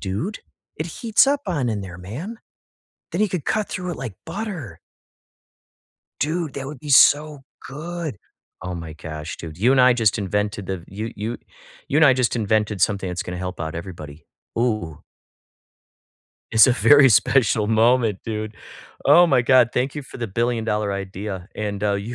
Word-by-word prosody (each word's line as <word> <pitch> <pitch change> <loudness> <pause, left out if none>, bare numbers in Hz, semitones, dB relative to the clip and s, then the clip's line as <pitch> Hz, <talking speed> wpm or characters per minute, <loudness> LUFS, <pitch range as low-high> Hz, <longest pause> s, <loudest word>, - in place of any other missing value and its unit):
dude 105 - -3 0.4
it 155 - -3
heats 225 - +2
up 285 0 +2
on 145 -10 -1
in 110 -3 -2
there, 90 -2 -9
man. 135 - -7 0.8
Then - - -1
he 215 - +3
could 180 -6 -4
cut 215 -1 0
through 180 -1 -4
it 170 - -5
like 125 -7 -6
butter. 165 - -6 1.4
Dude, 155 0 -1
that 135 -1 -5
would 140 -2 -8
be 150 - -9
so 145 +1 +5 0.3
good. 155 0 -5 0.4
Oh 90 0 -5
my 80 -2 -7
gosh, 80 0 -7
dude. 80 -2 -9
You 115 +7 +3
and 135 - +5
I 125 0 +6
just 115 -3 +1
invented 105 0 -2
the 90 -3 -5
you 110 +4 -5
you 110 +3 -4 0.5
you - - -1
and 160 - +6
I 140 - +7
just 125 -2 +1
invented 105 -2 0
something 100 0 +1
that's 90 0 -3
gonna 90 0 -6
help 90 -1 -5
out 80 0 -4
everybody. 80 -4 -9 0.3
Ooh! 110 -10 -1 1.5
It's 110 -1 +7
a 130 - +4
very 145 +2 +6
special 110 -1 +3
moment, 115 -1 +3
dude. 110 -1 -4 0.5
Oh 170 +5 +7
my 135 -6 +3
god. 125 -1 +5
Thank 130 +3 -1
you 150 - -5
for 130 - -11
the 115 - -3
billion-dollar 110 -1 -1
idea, 95 -1 -6
and, 105 -1 -4
uh, 105 - +2
you 100 +5 -4
115 Hz, 175 wpm, -22 LUFS, 95-140 Hz, 1.5 s, I